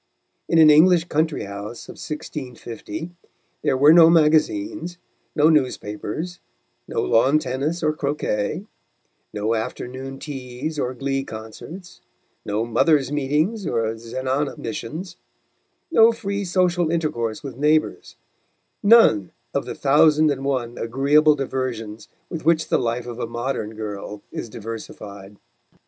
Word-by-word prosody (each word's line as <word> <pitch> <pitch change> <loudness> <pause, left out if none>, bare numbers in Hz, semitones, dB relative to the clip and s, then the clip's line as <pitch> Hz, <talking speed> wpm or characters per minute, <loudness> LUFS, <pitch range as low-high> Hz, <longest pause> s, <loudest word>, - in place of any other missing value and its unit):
In 165 - +3
an 155 -1 +8
English 165 +3 +6
country 155 0 0
house 100 +3 -7
of - - -8
1650, 150 +2 -7 0.5
there 130 - +1
were 145 +4 +7
no 165 -1 +8
magazines, 175 - +2 0.4
no 150 +1 +5
newspapers, 150 +3 -1 0.5
no - - -1
lawn 130 - +4
tennis 150 +4 -2
or 155 0 +2
croquet, 145 - -2 0.7
no 105 +2 -1
afternoon 130 +4 -5
teas 135 +2 -6
or 125 -1 -2
glee 135 +1 -2
concerts, 135 - -10 0.4
no 105 +2 -1
mothers' 135 +4 +2
meetings 150 +8 0
or 115 -1 0
zenana 130 +5 -3
missions, 160 - -6 0.7
no 225 -6 +7
free 200 -3 -3
social 175 -2 +1
intercourse 135 -10 -2
with 135 -4 -7
neighbours, 155 +1 +1 0.7
none 200 - +6 0.2
of - - -1
the - - -5
thousand 150 +2 +4
and 135 -1 -3
one 125 -4 -2
agreeable 145 +6 +3
diversions 125 -6 -4 0.2
with 165 -3 -6
which 160 0 +2
the - - +3
life 120 0 -2
of 120 -1 -7
a 115 - -2
modern 120 -2 -3
girl 105 -1 -6
is - - -6
diversified. 105 -3 -9
140 Hz, 125 wpm, -22 LUFS, 115-160 Hz, 0.7 s, an